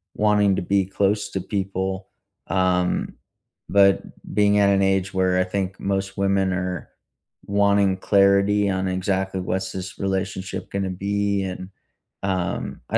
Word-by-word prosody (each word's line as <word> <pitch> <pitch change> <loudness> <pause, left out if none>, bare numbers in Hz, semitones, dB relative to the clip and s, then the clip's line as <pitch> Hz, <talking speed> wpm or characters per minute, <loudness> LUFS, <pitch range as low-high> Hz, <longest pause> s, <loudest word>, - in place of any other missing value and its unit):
wanting 105 -2 +3
to - - -1
be 95 +1 +1
close 100 +1 0
to 95 - -2
people, 95 -1 -3 0.4
um, 90 0 +1 0.6
but 100 0 +5 0.3
being 105 0 +3
at 100 - +5
an 100 0 +3
age 95 -1 +1
where 95 -1 +2
I - - +4
think 95 0 -3
most 100 0 -2
women 95 -1 +1
are 90 -2 -3 0.6
wanting 100 -1 +2
clarity 100 +1 +3
on 95 0 -1
exactly 95 +1 -1
what's 95 +1 -2
this 95 0 -7
relationship 95 -1 -3
gonna 95 -1 -2
be, 100 +1 -1
and, 95 0 -6 0.5
um, 95 -3 -2
I - - +2
95 Hz, 140 wpm, -23 LUFS, 95-100 Hz, 0.6 s, but